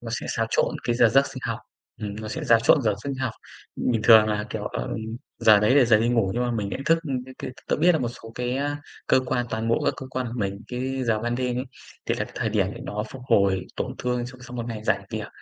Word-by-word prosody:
nó 115 -1 -7
sẽ - - -6
xáo 115 -1 0
trộn - - +2
cái 120 - +1
giờ 120 -2 +6
giấc 135 +4 +4
sinh 130 - -8
học, 115 0 -2 0.4
ừm, 105 -1 -4
nó 110 - -6
sẽ 105 - -4
xáo 115 -1 +6
trộn 130 +4 +5
giờ 105 -3 +2
sinh 140 -1 -2
học. 130 -3 -2 0.4
Bình 115 -3 0
thường 110 -2 +8
là, 105 0 -1
kiểu, 110 -2 -4
ờ, - - -3 0.5
giờ 105 -2 +6
đấy 105 +5 +4
là 140 -3 +7
giờ 110 -2 +5
đi 115 - +2
ngủ 115 -6 +2
nhưng 125 - 0
mà 120 - 0
mình 110 -4 -2
nhận 130 - -4
thức, 165 0 +5
ưm, 130 -5 -3
cái 130 0 -12
cái - - -5 0.2
tớ - - +2
biết 175 +3 +5
là 160 - +2
một 120 -3 -1
số 115 -1 -11
cái, 125 +1 -2
a, 145 +1 -2 0.3
cơ 130 - +4
quan 125 -1 0
toàn 110 +1 -2
bộ 115 - +2
các - - +2
cơ 130 - -7
quan 130 -1 -2
của 115 - -6
mình, 100 -1 -2
cái 130 +1 -2
giờ 110 -2 +2
ban 120 +1 -1
đêm 125 -1 -1
ấy, 125 - -2 0.4
thì - - +1
là - - -2
cái - - -14
thời - - 0
điểm - - +2
để - - -9
nó 105 +1 -3
phục 130 -2 -9
hồi 95 -2 +3
tổn - - -3
thương 125 -1 -1
sau 130 0 -11
sau 125 0 -9
một 120 0 -3
ngày 110 -2 -5
rảnh - - +1
việc. - - -4
120 Hz, 290 wpm, -25 LUFS, 110-130 Hz, 0.5 s, thường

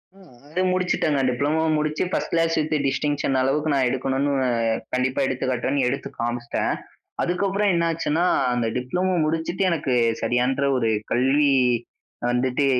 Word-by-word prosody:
அ - - -20 0.3
அது 180 +4 -1
முடிச்சுட்டேங்க. 180 -5 +1
டிப்ளமோ 145 +6 0 0.2
முடிச்சு, 150 0 -1
first - - -2
class 165 0 +2
with 155 0 0
distinction 145 0 0
அளவுக்கு 145 +4 +1
நான் 130 -2 +2
எடுக்கணுனு 135 +2 0 0.6
கண்டிப்பா 125 +1 0
எடுத்து 130 0 -2
காட்டுறேன்னு, 130 +3 0
எடுத்து 135 +2 -3
காமிச்சுட்டேன். 120 0 -2 0.5
அதுக்கப்புறம் 195 +3 0
என்னாச்சுன்னா, 165 0 0 0.3
அந்த 120 -1 0
டிப்ளமோ 180 +10 -1
முடிச்சுட்டு 165 +4 -1
எனக்கு 155 -6 -1 0.3
சரியான்ற 125 +4 +1
ஒரு 115 -3 +1 0.2
கல்வி 140 +4 +3 0.8
வந்துட்டு, 125 +3 +1
140 Hz, 125 wpm, -23 LUFS, 130-165 Hz, 0.8 s, கல்வி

